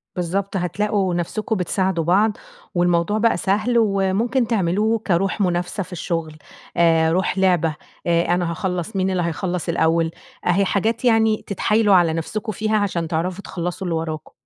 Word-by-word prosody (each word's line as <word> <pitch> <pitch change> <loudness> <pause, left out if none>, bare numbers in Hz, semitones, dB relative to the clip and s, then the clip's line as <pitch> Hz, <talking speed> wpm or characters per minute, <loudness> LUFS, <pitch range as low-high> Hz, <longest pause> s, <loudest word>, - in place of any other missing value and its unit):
بالضبط. 190 +3 -2
هتلاقوا 190 +1 0
نفسكم 210 +6 -2
بتساعدوا 185 -1 0
بعض، 200 +6 +2 0.4
والموضوع 175 +3 +2
بقى 230 +1 +2
سهل، 215 +4 +1
وممكن 220 +4 +1
تعملوه 215 +2 +1
كروح 195 +3 +1
منافسة 180 +1 -1
في 185 - -16
الشغل، 165 -3 -3 0.4
آآ، 165 -1 +4
روح 185 +2 0
لعبة، 175 -4 +2 0.3
آآ 170 0 +2
أنا 175 -1 -1
هاخلص، 180 +3 -3
مين 190 0 +1
اللي 185 -2 0
هيخلص 175 +1 -2
الأوّل؟ 165 0 +2 0.4
أهي 185 +3 +3
حاجات 220 +5 0
يعني 220 -2 +3
تتحايلوا 210 +1 +2
على 170 -3 +4
نفسكم 210 +7 -3
فيها 215 +2 0
عشان 185 -5 -1
تعرفوا 180 +4 -2
تخلصوا 175 +1 -4
اللي 165 - -1
وراكم. 155 -1 -4
185 Hz, 150 wpm, -21 LUFS, 170-210 Hz, 0.4 s, آآ